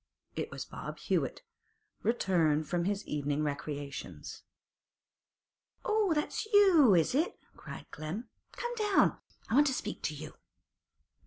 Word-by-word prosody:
It - - -3
was - - -6
Bob - - -7
Hewett, - - -1 0.6
returned 170 -9 +2
from 175 -1 0
his 200 +1 -1
evening 145 0 -1
recreations. 145 -1 -5 1.4
'Oh, 425 -6 +2
that's 300 +8 -1
you, 350 - +7
is 165 +4 +3
it?' 310 +6 +1 0.2
cried - - -9
Clem. 165 +11 -5 0.3
'Come 480 0 -3
down; 415 -3 +3 0.3
I - - -3
want 290 +4 +6
to 265 - +1
speak 210 - -4
to 150 - -2
you. 155 +1 -8
200 Hz, 130 wpm, -32 LUFS, -, 1.4 s, you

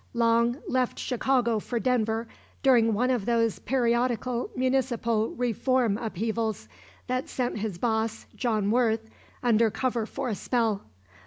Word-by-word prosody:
Long 235 +1 +3
left 255 -1 0
Chicago 245 -2 +1
for 235 +3 -3
Denver 225 -2 0 0.4
during 235 -5 +5
one 250 +4 +2
of 240 -6 -1
those 230 -2 +1
periodical 240 0 0
municipal 245 -4 +1
reform 245 -1 +1
upheavals 220 - -2 0.4
that 255 +1 -2
sent 245 -4 -2
his 205 -4 -3
boss, 220 +1 -1
John 215 -5 0
Worth, 225 -2 +1 0.3
under 230 -2 +4
cover 235 -1 -1
for 270 0 -4
a - - -1
spell. 220 0 0
235 Hz, 130 wpm, -27 LUFS, 220-250 Hz, 0.4 s, during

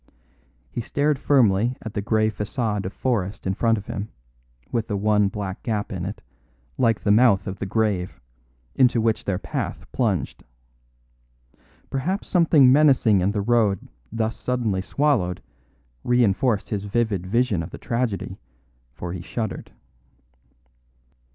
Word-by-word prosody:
He - - -3
stared 145 +4 0
firmly 120 -4 +3
at 110 - -6
the 100 - -2
grey 110 +1 +1
façade 105 -2 -2
of - - -5
forest 105 -5 -2
in 95 - 0
front 115 +3 +2
of 100 - -7
him, 105 +2 -5 0.6
with 115 -2 -1
the 105 - -2
one 105 0 +3
black 100 -1 -5
gap 110 -1 -2
in 90 -1 -4
it, 100 - -6 0.5
like 115 -4 +1
the 100 - +3
mouth 105 -3 +4
of 95 -1 -5
the 100 - -3
grave, 95 -8 -1 0.5
into 125 -2 +3
which 110 -1 0
their 95 -3 0
path - - -4
plunged. 100 - -1 1.5
Perhaps 175 +10 -2
something 160 -7 +5
menacing 130 -8 +5
in 95 +3 +2
the 105 -1 -1
road 105 -3 +1 0.2
thus 110 0 -1
suddenly 115 -7 -1
swallowed 100 -8 0 0.6
reinforced 120 -2 +2
his 105 -1 -3
vivid 100 -4 -1
vision 115 -3 +1
of 85 - -6
the - - -9
tragedy, 115 -5 -3 0.6
for 85 +4 -5
he 90 - -5
shuddered. 110 +4 -5
110 Hz, 140 wpm, -23 LUFS, 100-120 Hz, 1.5 s, something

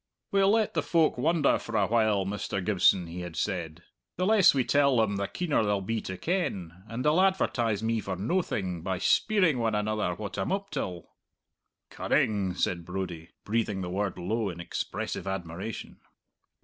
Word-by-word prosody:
'We'll 195 0 +4
let 220 0 +2
the - - +1
folk 165 -3 +2
wonder 155 +3 +2
for 115 -1 -3
a 100 - +3
while, 110 -3 +2
Mr. 100 -1 -3
Gibson,' 95 -3 +3
he 85 +2 -7
had 90 -2 -6
said. 85 -4 -3 0.3
'The 185 - +1
less 205 -3 +6
we 135 -2 +1
tell 140 0 +3
them, 105 -3 +2
the 100 0 -1
keener 165 -9 0
they'll 105 -1 +1
be 110 +4 -2
to 95 - -6
ken; 95 - -2
and 115 +4 -4
they'll 155 +5 +4
advertise 120 - +1
me 115 0 +1
for 95 -2 -4
noathing 95 - -1
by 95 +2 -2
speiring 180 - +3
one 115 -2 +1
another 105 -3 -1
what 105 +1 -5
I'm - - -1
up 200 +1 -2
till.'" 90 -2 -4 0.8
"Cunning!" 100 -4 0
said 85 -2 -1
Brodie, 90 -2 -5 0.2
breathing 105 -3 -1
the 90 -1 -4
word 100 +1 -2
low 105 +4 -1
in 85 -2 -7
expressive 85 - -4
admiration. 95 +2 -5
105 Hz, 175 wpm, -28 LUFS, 95-140 Hz, 0.8 s, less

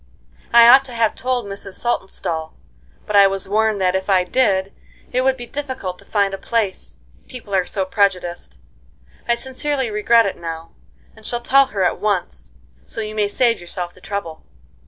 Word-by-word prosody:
I 235 0 +8
ought 260 +3 +8
to 250 -3 -7
have 230 -2 +2
told 250 -1 -2
Mrs. 200 -1 -7
Saltonstall, 170 -8 -2 0.5
but 210 - -3
I 200 -1 +8
was 195 -1 -3
warned 215 +1 +1
that 185 0 +2
if 190 +1 -2
I 185 -2 +4
did 195 -2 +1 0.4
it 255 - +1
would 265 0 +2
be 240 - -7
difficult 260 -10 -5
to - - -13
find 200 -2 0
a 195 - -5
place, 220 -5 -2 0.3
people 235 -6 -9
are 185 -2 +2
so 195 -2 -2
prejudiced. 180 - -1 0.7
I 235 - +3
sincerely 265 0 -2
regret 225 +2 +4
it 195 - -3
now, 165 -1 -7 0.4
and - - -17
shall 240 0 -2
tell 275 +2 +4
her 200 -7 -2
at 180 - 0
once, 175 - -2 0.3
so - - -8
you 215 -1 -4
may 210 -1 +1
save 230 0 +1
yourself 175 0 -5
the 185 - -20
trouble." 170 -6 -5
205 Hz, 180 wpm, -20 LUFS, 185-235 Hz, 0.7 s, I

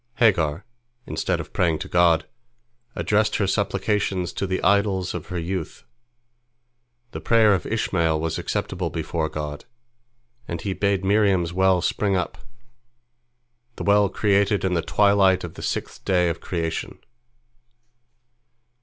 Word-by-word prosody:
Hagar, 90 - +2 0.4
instead - - -2
of - - -8
praying 85 -4 +1
to - - -6
God, 85 -2 +3 0.7
addressed 105 +1 +1
her 100 - +1
supplications 95 -2 -1
to 100 - -3
the 95 0 -1
idols 100 -2 +2
of 90 - -6
her 90 - -4
youth. 85 0 -4 1.3
The - - -7
prayer 110 -3 +4
of 95 - -2
Ishmael 85 -8 0
was 80 0 -2
acceptable 90 -2 -3
before 80 0 -3
God, 75 -1 -6 0.8
and 85 - -4
He 95 +2 -3
bade 100 -1 0
Miriam's 95 -4 +2
well 95 -1 +3
spring 100 +1 0
up, 90 -2 -3 1.4
the - - -6
well 100 -1 +4
created 100 0 +1
in 95 - 0
the 85 - +1
twilight 100 +1 +3
of 85 - -6
the - - -10
sixth - - -4
day 90 -3 +2
of 85 0 -4
creation. 85 -2 -3
95 Hz, 135 wpm, -23 LUFS, 85-100 Hz, 1.4 s, prayer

